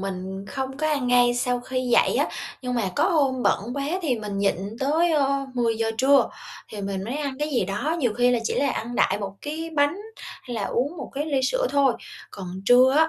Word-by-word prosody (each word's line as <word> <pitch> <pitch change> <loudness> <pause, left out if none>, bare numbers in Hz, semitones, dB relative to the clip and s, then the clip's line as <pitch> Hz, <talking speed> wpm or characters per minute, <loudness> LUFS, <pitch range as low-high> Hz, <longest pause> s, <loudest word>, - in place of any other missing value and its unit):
mình 190 0 -5
không 265 +3 -4
có 310 +1 0
ăn 280 -5 0
ngay 245 0 +4
sau 245 0 0
khi 255 +1 -3
dậy 250 -2 +3
á, - - +2 0.4
nhưng 250 -1 -2
mà 220 -5 0
có - - +3
hôm 275 -7 +2
bận - - +3
quá 280 0 -2 0.2
thì 285 -7 +1
mình 205 -2 -4
nhịn 200 0 +2 0.2
tới, 320 +5 +2
ơ, 275 -2 +1
10:00 225 -2 +1
trưa, 275 +3 +5 0.4
thì 210 - -7
mình 195 -1 -3
mới 245 +7 -3
ăn 280 -3 -3
cái 300 +1 -1
gì 255 -9 +1
đó, 290 - -1
nhiều 245 -8 +1
khi 245 +2 +3
là 245 - +3
chỉ - - 0
là 280 -1 +1
ăn 240 +1 -4
đại 195 - +2
một 195 -1 -4
cái 320 +3 -4
bánh 290 +3 +3 0.5
hay 245 -2 -6
là 215 - -2
uống 285 +8 -1
một - - -7
cái 290 +2 -1
ly 275 -3 +1
sữa - - +1
thôi. 280 -3 +4 0.4
Còn 195 -2 -8 0.2
trưa 255 +4 +6
á, 320 0 +5
255 Hz, 230 wpm, -24 LUFS, 230-285 Hz, 0.5 s, trưa